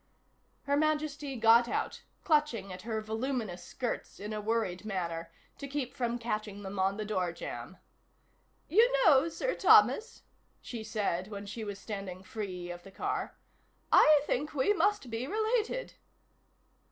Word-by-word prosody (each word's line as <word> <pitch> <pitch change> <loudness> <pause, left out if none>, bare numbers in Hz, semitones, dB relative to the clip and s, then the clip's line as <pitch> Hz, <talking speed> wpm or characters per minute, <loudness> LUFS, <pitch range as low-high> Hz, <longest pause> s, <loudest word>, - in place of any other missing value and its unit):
Her 285 0 +1
Majesty 300 -2 0
got 230 +1 +5
out, - - -2 0.2
clutching 295 - +1
at 185 - -8
her 220 0 -3
voluminous 220 -4 -3
skirts 245 +6 -4
in 210 +2 -5
a 210 - -3
worried 215 -4 -1
manner, 170 -5 -3 0.3
to 280 - -5
keep 275 -3 -3
from 240 -1 -1
catching 215 -3 -4
them 195 0 -5
on 195 +1 +1
the 215 - -3
door 185 -4 -1
jamb. 170 - -7 0.9
"You 450 +9 +5
know, 305 -1 +6
Sir - - -2
Thomas," 445 - +4 0.4
she 230 -3 -7
said 205 -4 -1
when 205 -1 -7
she 205 +3 -6
was 205 -2 -5
standing 195 -3 -6
free 185 -4 -5
of 175 0 -8
the 195 - -13
car, - - -3 0.5
"I 305 -2 +7
think 295 +3 -2
we 285 +10 +3
must 410 - +1
be 230 +3 -3
related." 440 - -1
225 Hz, 150 wpm, -31 LUFS, 195-290 Hz, 0.9 s, I